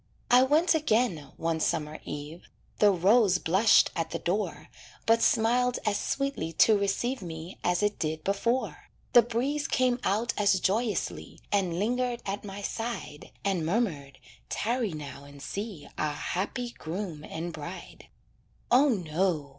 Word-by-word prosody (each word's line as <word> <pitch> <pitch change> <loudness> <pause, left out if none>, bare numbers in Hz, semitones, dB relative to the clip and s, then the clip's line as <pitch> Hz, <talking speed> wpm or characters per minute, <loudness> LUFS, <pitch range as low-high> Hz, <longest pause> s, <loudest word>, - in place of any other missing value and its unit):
I 250 +1 +8
went 300 +7 +4
again, 220 - +1
one 165 0 -1
summer 155 -1 -1
eve; 150 +3 -7 0.3
The 210 - +6
rose 195 +1 +4
blushed 190 +6 +4
at 165 -1 -2
the 165 - -3
door 190 +6 -2 0.4
But 230 0 +4
smiled 245 +2 +3
as 205 -1 +1
sweetly 275 - -2
to 220 +6 +5
receive 210 +6 -1
Me 165 0 -8
as 180 +2 +1
it 205 0 0
did 155 -1 -2
before; 230 +6 -1 0.2
The 240 - +9
breeze 255 +6 -1
came 255 -1 +2
out 220 +3 +1
as 200 -2 +4
joyously, 210 +2 -1
And 185 -4 +1
lingered 245 +4 -1
at 200 +1 -3
my 200 0 -7
side, 225 -10 -5 0.2
And 190 -4 +1
murmured: 160 - -1 0.3
"Tarry 230 -3 -1
now 145 -2 -8
and 140 0 -13
see 195 0 -6
Our 150 -1 0
happy 220 - -3
groom 170 -4 -6
and 165 +2 -5
bride." 165 +4 -9 0.6
"O, 270 +4 +6
no!" 170 - 0
200 Hz, 145 wpm, -28 LUFS, 165-235 Hz, 0.6 s, The